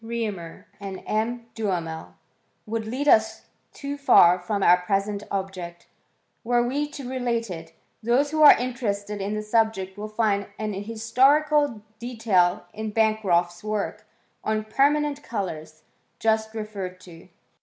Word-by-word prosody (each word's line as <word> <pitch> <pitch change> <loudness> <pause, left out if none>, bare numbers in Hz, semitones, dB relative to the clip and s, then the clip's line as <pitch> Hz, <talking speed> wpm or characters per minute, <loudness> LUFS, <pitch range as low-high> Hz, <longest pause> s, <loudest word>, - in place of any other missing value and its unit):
Reaumur, 215 -8 -5
and 195 -2 -7
M. 230 +2 -1
Duhamel, 175 -7 -3 0.5
would 220 0 -3
lead 265 +6 -3
us 220 -4 +3 0.3
too 285 0 -6
far 180 -10 +6
from 200 +2 -2
our 175 +1 +7
present 200 +2 -1
object, 185 -3 -5 0.6
were 240 +1 +2
we 290 +4 -1
to 280 -3 -8
relate 240 -4 -2
it: 165 -1 -8 0.3
those 250 +6 +2
who 310 0 0
are 300 - +10
interested 210 -5 -3
in 205 +2 -2
the 215 - -3
subject 210 -3 0
will 210 - -4
find 210 -2 0
an 215 -1 -3
historical 250 +5 +2 0.2
detail 220 -6 +1
in 220 0 -4
Bancroft's 200 -5 +1
work 215 -1 -3 0.4
on 215 0 -1
Perma* 285 +7 +3
nent 290 -1 -4
Colours, 160 - -5 0.3
just 220 0 0
referred 200 -4 -5
to. 170 -2 -14
215 Hz, 135 wpm, -25 LUFS, 195-235 Hz, 0.6 s, are